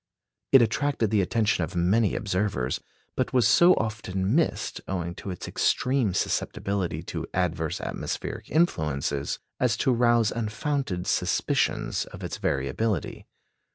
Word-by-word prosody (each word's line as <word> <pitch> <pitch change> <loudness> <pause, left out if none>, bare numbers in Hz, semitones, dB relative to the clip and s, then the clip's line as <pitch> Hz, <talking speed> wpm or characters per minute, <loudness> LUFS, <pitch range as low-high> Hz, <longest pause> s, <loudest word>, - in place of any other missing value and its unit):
It 135 -3 +8
attracted 115 -1 0
the 105 -2 +3
attention 105 -1 +1
of 80 - -5
many 95 +5 +2
observers, 95 - -1 0.4
but - - -1
was 125 -2 +4
so 175 +1 +6
often 105 -3 -2
missed, 165 +2 0
owing 85 -2 -3
to 95 - -8
its 90 - -6
extreme 125 -7 +1
susceptibility 100 -2 -1
to - - -5
adverse 80 -3 -1
atmospheric - - -5
influences, 75 - 0 0.2
as 120 -4 +2
to 130 - +2
rouse 120 -2 +3
unfounded 115 - -2
suspicions - - 0
of - - -11
its - - -4
variability. 70 +8 -2
105 Hz, 125 wpm, -26 LUFS, 90-120 Hz, 0.4 s, It